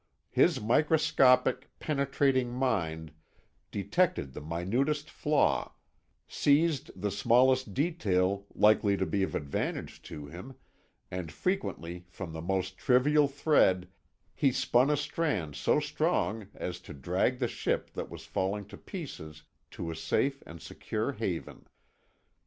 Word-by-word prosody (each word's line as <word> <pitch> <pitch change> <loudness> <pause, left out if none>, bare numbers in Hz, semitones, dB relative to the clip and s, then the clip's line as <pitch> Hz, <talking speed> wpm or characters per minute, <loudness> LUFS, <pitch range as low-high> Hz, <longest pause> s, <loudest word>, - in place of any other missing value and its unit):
His - - +3
microscopic, 130 0 +3
penetrating 135 -3 +1
mind 85 - -1 0.6
detected 100 - 0
the - - -7
minutest 120 - -1
flaw, 150 0 +1 0.5
seized 150 +1 +2
the 105 +1 -1
smallest 125 -1 +3
detail 100 - 0
likely 105 -1 +4
to 95 - 0
be 95 +4 -1
of 95 - -1
advantage 70 -1 -3
to 75 -3 -7
him, 90 - -10 0.6
and 90 -3 -4
frequently 90 - -3
from 85 -2 -7
the 80 - -5
most 95 +1 -2
trivial 145 +4 +4
thread 135 - +2 0.4
he 140 - +2
spun 130 0 +3
a 150 - +2
strand 145 - -2
so 75 - +2
strong 150 - -1
as 90 - -5
to - - -11
drag 90 - 0
the 125 -1 0
ship - - -2
that - - -5
was - - -10
falling 100 +2 -2
to 100 - -10
pieces 80 - -8 0.3
to 85 - -5
a - - -5
safe 130 - 0
and 80 0 -10
secure - - -3
haven. - - -5
115 Hz, 130 wpm, -30 LUFS, 90-140 Hz, 0.6 s, likely